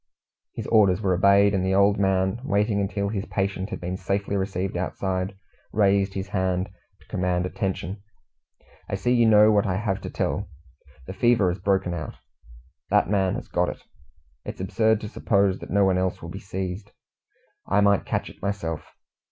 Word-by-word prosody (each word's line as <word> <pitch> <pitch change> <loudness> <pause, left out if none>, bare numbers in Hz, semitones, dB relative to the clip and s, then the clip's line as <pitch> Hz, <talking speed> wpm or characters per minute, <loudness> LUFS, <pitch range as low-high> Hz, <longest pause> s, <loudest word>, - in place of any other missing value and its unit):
His - - -5
orders 100 -4 +4
were 95 -3 +1
obeyed, 100 +2 +5
and 95 -2 +1
the 95 0 +1
old 100 +1 +4
man, 95 +2 +1
waiting 105 -3 +1
until 100 0 -1
his 100 -1 -3
patient 95 0 -2
had - - -5
been 90 +1 -4
safely 100 +2 -2
received 95 -1 -2
outside, 95 +1 -2 0.3
raised 100 -1 +2
his 95 0 -4
hand 95 -1 -1 0.3
to - - -23
command 90 -1 -1
attention. 95 0 -3 0.9
"I - - -1
see 120 +6 +1
you 120 -2 +4
know 105 0 +6
what 105 -1 +2
I 90 - 0
have 95 0 -2
to - - -6
tell. 95 -2 -2 0.6
The 95 - -7
fever 115 -3 +3
has 90 +2 -3
broken 95 -2 +1
out. 80 -4 -5 0.7
That - - +2
man 95 -2 +2
has - - -6
got - - 0
it. - - -8 0.6
It - - -6
is - - -9
absurd 110 +3 +1
to 105 - -5
suppose 100 -2 +1
that - - -10
no 100 0 +3
one 95 -1 +2
else 95 -1 -1
will 85 - -6
be 95 - -7
seized. 95 +1 -5 0.7
I 105 - +2
might 100 -1 +3
catch - - -2
it - - -13
myself. 90 -6 -3
95 Hz, 185 wpm, -25 LUFS, 95-100 Hz, 0.9 s, know